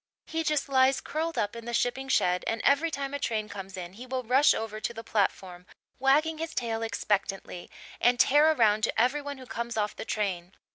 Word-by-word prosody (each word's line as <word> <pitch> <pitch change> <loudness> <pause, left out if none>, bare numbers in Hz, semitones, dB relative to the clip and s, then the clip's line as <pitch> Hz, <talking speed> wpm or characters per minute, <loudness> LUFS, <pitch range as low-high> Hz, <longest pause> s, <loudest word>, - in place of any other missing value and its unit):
He 325 0 -2
just 305 -2 0
lies 265 0 +3
curled 325 +2 -3
up 205 +2 -1
in 230 -1 -8
the 240 0 -2
shipping 265 +3 -1
shed, 180 -7 +2
and 225 - -1
every 290 +4 +3
time 275 -3 -4
a 285 - -2
train 220 -6 -2
comes 195 -2 -8
in 180 0 -7
he 245 +5 -10
will 255 0 -3
rush 260 +5 +4
over 220 -1 -4
to 235 - -3
the 225 - -7
platform, 190 -4 -2 0.3
wagging 300 +4 +2
his 320 0 -5
tail 230 -2 -2
expectantly, 200 -4 -2 0.3
and 245 0 +3
tear 295 +5 +5
around 220 -7 +3
to - - -2
every 255 +5 +2
one 285 -1 -6
who 260 - -11
comes 235 -1 -5
off 210 -1 -1
the - - -6
train. 190 -5 -3
235 Hz, 210 wpm, -28 LUFS, 210-280 Hz, 0.3 s, tear